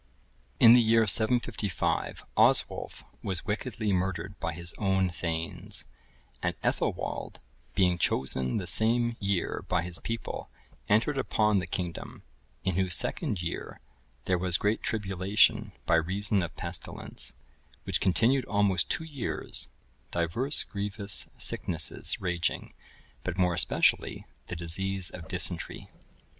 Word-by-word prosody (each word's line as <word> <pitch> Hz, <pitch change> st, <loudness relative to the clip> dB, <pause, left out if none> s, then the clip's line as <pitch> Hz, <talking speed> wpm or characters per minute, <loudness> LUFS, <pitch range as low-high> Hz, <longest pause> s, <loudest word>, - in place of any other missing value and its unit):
In 115 Hz, 0 st, +9 dB
the 120 Hz, -, +7 dB
year 115 Hz, 0 st, +4 dB
755, 110 Hz, -3 st, 0 dB
Oswulf -, -, +2 dB, 0.2 s
was 95 Hz, -3 st, -2 dB
wickedly 110 Hz, -1 st, -1 dB
murdered 95 Hz, +1 st, -1 dB
by -, -, -2 dB
his 85 Hz, +1 st, -3 dB
own 95 Hz, -2 st, +2 dB
thegns; 85 Hz, -1 st, -3 dB, 0.6 s
and -, -, 0 dB
Ethelwald, -, -, -2 dB, 0.4 s
being 90 Hz, -3 st, +3 dB
chosen 65 Hz, -3 st, +1 dB
the 95 Hz, -, -3 dB
same 115 Hz, +6 st, +3 dB
year 100 Hz, -3 st, -1 dB
by 90 Hz, -2 st, +1 dB
his 90 Hz, -1 st, -4 dB
people, 115 Hz, 0 st, -5 dB, 0.4 s
entered 115 Hz, +7 st, +3 dB
upon 105 Hz, -6 st, +2 dB
the 90 Hz, -, -4 dB
kingdom; 85 Hz, -1 st, -5 dB, 0.4 s
in 95 Hz, -2 st, 0 dB
whose 95 Hz, -2 st, +2 dB
second 90 Hz, -4 st, +1 dB
year 85 Hz, -, -5 dB, 0.5 s
there 90 Hz, -1 st, +1 dB
was 90 Hz, -1 st, +2 dB
great 105 Hz, +2 st, 0 dB
tribulation 105 Hz, +1 st, +2 dB
by 85 Hz, -, +4 dB
reason 100 Hz, +4 st, +1 dB
of 85 Hz, -3 st, -4 dB
pestilence, -, -, -4 dB, 0.5 s
which -, -, 0 dB
continued 115 Hz, +7 st, +3 dB
almost 100 Hz, -3 st, +2 dB
two -, -, 0 dB
years, 145 Hz, -6 st, -2 dB, 0.4 s
divers 90 Hz, -, +1 dB
grievous 100 Hz, 0 st, -2 dB
sicknesses 85 Hz, -3 st, -1 dB
raging, 90 Hz, -2 st, -1 dB, 0.5 s
but 90 Hz, -1 st, -3 dB
more 90 Hz, -2 st, +3 dB
especially 85 Hz, -, +2 dB, 0.2 s
the -, -, -5 dB
disease 90 Hz, +3 st, -1 dB
of 85 Hz, -3 st, -9 dB
dysentery. -, -, -2 dB
95 Hz, 125 wpm, -29 LUFS, 85-110 Hz, 0.6 s, In